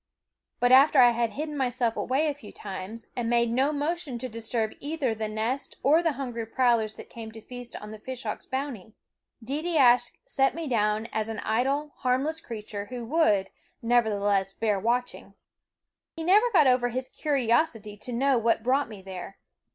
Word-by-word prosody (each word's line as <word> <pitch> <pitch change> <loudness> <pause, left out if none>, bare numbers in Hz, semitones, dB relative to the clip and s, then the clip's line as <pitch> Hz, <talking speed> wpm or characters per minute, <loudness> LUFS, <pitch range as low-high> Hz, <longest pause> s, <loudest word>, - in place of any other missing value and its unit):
But 245 0 +3
after 275 +3 +7
I 245 -2 +8
had 235 -1 0
hidden 300 +7 -5
myself 245 -4 0
away 270 +5 0
a 300 - 0
few 250 -7 -13
times, 205 +3 -7
and 235 -2 -1
made 235 -1 +2
no 265 +5 +2
motion 300 -2 -2
to 255 - -4
disturb 225 -1 -2
either 285 -5 -1
the 220 0 -3
nest 220 +6 -3
or 305 +5 +5
the 330 -3 +1
hungry 240 -5 -5
prowlers 230 -3 +2
that - - -10
came 225 -1 -9
to 220 - -9
feast 245 +1 -9
on 210 0 -8
the 215 - -9
fish 260 +3 -7
hawks' - - -5
bounty, 260 -6 -4 0.5
Deedeeaskh 270 -4 +3
set 270 -1 +1
me 330 -2 -4
down 215 -2 +1
as 220 0 -1
an 220 - -4
idle, 270 +7 0
harmless 270 +5 0
creature 210 -3 -6
who 245 -2 -6
would, 225 -9 +2 0.3
never 235 -1 +3
theless, 200 -2 0
bear 210 -3 +1
watching. 240 +4 -2 0.8
He 325 - -5
never 410 +7 +5
got 335 -8 +5
over 250 -1 +3
his 255 +2 -3
curiosity 240 -6 0
to 250 - -6
know 260 +1 +2
what 230 -1 +1
brought 265 +2 +1
me 205 -4 -10
there. 190 0 -8
245 Hz, 180 wpm, -27 LUFS, 220-275 Hz, 0.8 s, I